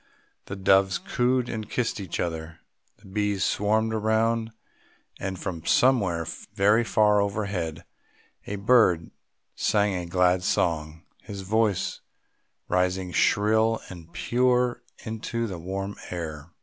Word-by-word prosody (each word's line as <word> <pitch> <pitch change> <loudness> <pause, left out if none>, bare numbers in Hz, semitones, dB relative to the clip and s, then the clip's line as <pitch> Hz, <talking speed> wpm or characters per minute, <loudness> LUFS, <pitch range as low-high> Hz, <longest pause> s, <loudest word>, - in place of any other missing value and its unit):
The 100 - -6
doves 95 -1 +3
cooed 125 0 0
and 110 -2 -5
kissed 120 -3 -1
each 95 -4 -5
other; 80 -1 -3 0.4
the - - -22
bees 100 0 -1
swarmed 110 +2 +1
around, 110 +1 +1 0.7
and 95 -1 -4
from 85 -3 -5
somewhere 100 -9 +3 0.3
very 105 +4 +4
far 105 -2 +3
overhead 100 -6 -3 0.6
a 105 - -3
bird 100 -6 +3 0.4
sang 105 -1 +1
a 90 -2 -3
glad 90 +1 +2
song, 80 -3 -1 0.2
his 100 -1 -7
voice 105 0 0 0.7
rising 90 0 0
shrill 110 +6 +3
and 85 -3 -11
pure 125 +1 +1 0.2
into 115 +1 -3
the 95 -6 -5
warm 95 +3 -4
air. 80 -3 -6
100 Hz, 120 wpm, -26 LUFS, 90-110 Hz, 0.7 s, very